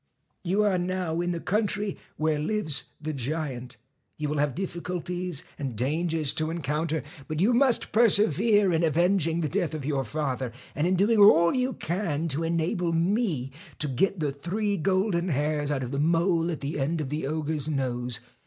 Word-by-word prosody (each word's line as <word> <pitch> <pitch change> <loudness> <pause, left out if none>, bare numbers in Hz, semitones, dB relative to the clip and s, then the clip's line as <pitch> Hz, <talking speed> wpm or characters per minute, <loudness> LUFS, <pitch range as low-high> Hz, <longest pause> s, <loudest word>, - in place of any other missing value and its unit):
'You 195 +4 +2
are 195 -3 +2
now 175 -2 -1
in 175 - -1
the 170 - -2
country 205 +1 -1 0.2
where 155 -1 +1
lives 155 -3 -1
the 155 +1 -4
giant. 135 -2 -4 0.4
'You 150 -1 -2
will 150 -1 -1
have 145 -3 +1
difficulties 180 -2 -3 0.2
and 135 -5 -3
dangers 155 +4 +1
to 155 0 -1
en 165 -1 -4
counter, 150 +2 -1 0.2
but 155 0 -3
you 210 +8 +4
must 250 0 +3
persevere 210 -2 +4
in 165 +1 +2
avenging 170 +1 +2
the 155 - 0
death 170 -1 -1
of 145 -4 -5
your 140 -2 0
father, 130 -2 -3 0.2
and 150 +4 0
in 185 - +2
doing 210 +4 +3
all 170 -5 +7
you 255 0 0
can 170 -3 -2
to 145 +2 0
enable 170 +2 0
me 170 - 0 0.3
to 150 - -1
get 180 +8 0
the 150 -3 0
three 200 +9 -2
gold 190 +3 +1
hairs 150 -3 0
out 140 -3 -1
of 125 - -5
the 140 - -2
mole 165 +2 +2
at 160 - -4
the 145 +1 -3
end 155 +5 0
of 145 -4 -3
the 150 -1 -2
ogre's 155 -1 -2
nose. 125 -5 -2
165 Hz, 180 wpm, -27 LUFS, 145-185 Hz, 0.4 s, all